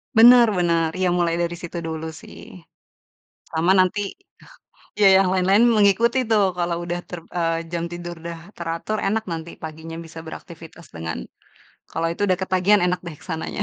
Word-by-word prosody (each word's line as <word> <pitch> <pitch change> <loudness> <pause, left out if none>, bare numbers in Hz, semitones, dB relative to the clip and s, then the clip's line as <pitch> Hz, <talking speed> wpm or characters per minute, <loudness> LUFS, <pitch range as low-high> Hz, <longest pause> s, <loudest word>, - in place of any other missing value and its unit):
Benar 240 +1 +8
benar, 170 -2 +2
iya 185 - +2
mulai 170 -1 +1
dari 170 0 -1
situ 175 0 -6
dulu 160 0 -4 0.2
sih. - - -13 1.1
Sama 165 +3 +2
nanti 185 +3 +2 1.0
iya, 205 -1 +4
yang 195 - +2
lain-lain 190 +4 +4
mengikuti 215 +5 +3
tuh, 215 -2 +4 0.2
kalau 170 -1 0
udah 175 0 -3
ter 180 - -6 0.2
eee, 165 -1 0
jam 170 -1 -2
tidur 175 0 -6
udah 170 0 -6 0.2
teratur, 170 +5 -3
enak 220 +2 0
nanti 165 +1 -5
paginya 160 +1 -7
bisa 165 0 -11
beraktivitas 165 0 -11
dengan 80 0 -4 0.7
kalau 165 - -1
itu 170 - -5
udah 185 -2 +1
ketagihan 190 +2 +3
enak 180 0 0
deh, 160 -3 -7
ke - - -18
sananya. 160 -2 -3
175 Hz, 165 wpm, -22 LUFS, 165-190 Hz, 1.1 s, Benar